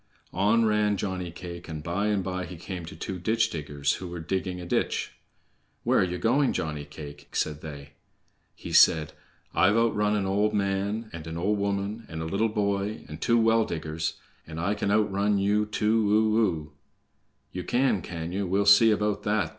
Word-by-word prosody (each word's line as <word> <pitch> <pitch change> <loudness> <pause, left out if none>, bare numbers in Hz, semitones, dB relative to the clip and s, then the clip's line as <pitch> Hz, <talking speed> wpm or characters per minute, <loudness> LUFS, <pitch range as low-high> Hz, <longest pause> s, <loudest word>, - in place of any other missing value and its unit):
On 105 +5 +3
ran 105 -1 +2
Johnny 95 -3 -3
cake, 85 0 -9
and 80 -2 -6
by 90 +6 -1
and 105 -2 +1
by 90 0 -3
he 90 - -8
came 90 0 -6
to - - -9
two 90 +3 -5
ditch 115 +4 +1
diggers 75 -2 -2
who 90 - -5
were 85 0 -6
digging 90 +2 -3
a 90 - -7
ditch. - - -1 0.7
"Where - - +3
ye 90 0 -2
going, 125 - +2
Johnny 75 -2 -3
cake?" 75 -1 -10
said 75 -1 -1
they. 70 -2 -9 0.6
He - - -8
said: 80 -1 +5 0.4
"I've 105 +4 +4
outrun 105 -2 +2
an 100 -2 0
old 105 +3 +1
man, 100 +2 -1
and 85 -1 -7
an 80 0 -5
old 100 +4 0
woman, 100 +3 -2
and 80 - -6
a 80 - -3
little 100 +7 0
boy, 100 0 -1
and - - -9
two 120 -1 +3
well 115 0 +4
diggers, 80 -3 -3 0.3
and 80 0 -7
I 95 +5 0
can 105 - -2
outrun 100 -1 +2
you 105 +2 +2
too 105 0 +1
o 110 +1 +3
o!" 75 -8 -1 0.8
"Ye 90 - -4
can, 120 -1 +1
can 85 0 -5
ye? 95 +2 -2
We'll 100 +1 +1
see 100 +3 +7
about 105 -1 +1
that!" 105 0 0
100 Hz, 185 wpm, -27 LUFS, 85-105 Hz, 0.8 s, see